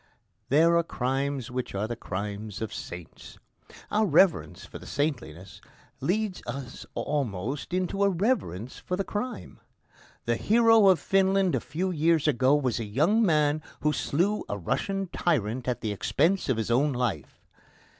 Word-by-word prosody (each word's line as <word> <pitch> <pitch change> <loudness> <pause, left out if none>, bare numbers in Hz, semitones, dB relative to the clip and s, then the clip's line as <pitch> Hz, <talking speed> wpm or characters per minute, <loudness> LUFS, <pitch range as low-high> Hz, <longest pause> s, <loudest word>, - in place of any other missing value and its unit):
There 165 +5 +5
are 170 - +3
crimes 135 -2 -2
which 125 -4 -4
are 100 +2 -1
the 120 - -4
crimes 105 0 -5
of 110 -1 -4
saints. 90 -2 -9 0.5
Our 215 +1 +2
reverence 170 +2 +3
for - - -10
the - - -12
saintliness 100 - -3 0.4
leads 205 +1 -1
us 135 -2 -7
almost 135 - -3
into 185 +2 0
a 200 - +4
reverence 170 - -1
for 180 - -3
the 195 - -1
crime. 240 +6 -5 0.7
The - - +1
hero 225 -2 +5
of 185 -3 +5
Finland 195 -1 +2
a - - +2
few 180 +6 -3
years 160 -1 +2
ago 130 0 +3
was 130 -5 0
a - - -2
young 155 - +2
man 155 -4 +2 0.2
who 150 0 +2
slew 190 +11 0
a 100 - -2
Russian 195 - -2
tyrant 125 - 0
at 125 - -1
the 110 - -2
expense 165 - +1
of 130 - +2
his 115 0 -2
own 140 +4 +3
life. 120 - -3
145 Hz, 155 wpm, -27 LUFS, 115-185 Hz, 0.7 s, There